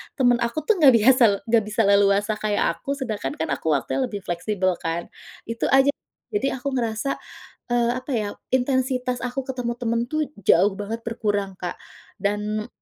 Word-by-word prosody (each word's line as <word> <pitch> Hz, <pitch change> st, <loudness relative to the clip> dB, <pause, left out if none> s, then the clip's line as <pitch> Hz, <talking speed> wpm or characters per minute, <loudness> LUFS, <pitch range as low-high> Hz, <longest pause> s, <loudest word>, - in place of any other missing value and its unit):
temen 245 Hz, -3 st, +4 dB
aku 235 Hz, +7 st, -3 dB
tuh 440 Hz, -, +2 dB
enggak 290 Hz, -6 st, +7 dB
biasa 250 Hz, +3 st, +5 dB, 0.3 s
enggak 225 Hz, -1 st, +4 dB
bisa 215 Hz, +2 st, 0 dB
leluasa 200 Hz, +1 st, +4 dB
kayak 210 Hz, -1 st, 0 dB, 0.2 s
aku, 280 Hz, -, -3 dB
sedangkan 215 Hz, -, -3 dB
kan 160 Hz, -, -2 dB
aku -, -, -15 dB
waktunya 260 Hz, -, -1 dB
lebih 205 Hz, -5 st, -6 dB
fleksibel 185 Hz, +1 st, -1 dB
kan? 165 Hz, +1 st, -4 dB, 0.4 s
Itu 230 Hz, 0 st, -2 dB
aja. 270 Hz, +1 st, +6 dB, 0.4 s
Jadi 410 Hz, -10 st, +1 dB
aku 270 Hz, +1 st, -3 dB
ngerasa, 235 Hz, +1 st, -1 dB, 0.6 s
eee, 240 Hz, -1 st, +2 dB
apa 255 Hz, +3 st, -9 dB
ya 220 Hz, -4 st, 0 dB, 0.3 s
intensitas 255 Hz, -1 st, 0 dB
aku 250 Hz, +2 st, -2 dB
ketemu 250 Hz, -2 st, -2 dB
temen 230 Hz, -1 st, 0 dB
tuh 310 Hz, -1 st, -1 dB
jauh 195 Hz, 0 st, +3 dB
banget 210 Hz, +3 st, -4 dB
berkurang, 205 Hz, -4 st, -2 dB
Kak. 180 Hz, -, -4 dB, 0.5 s
Dan 210 Hz, +1 st, -1 dB
230 Hz, 165 wpm, -23 LUFS, 205-255 Hz, 0.6 s, enggak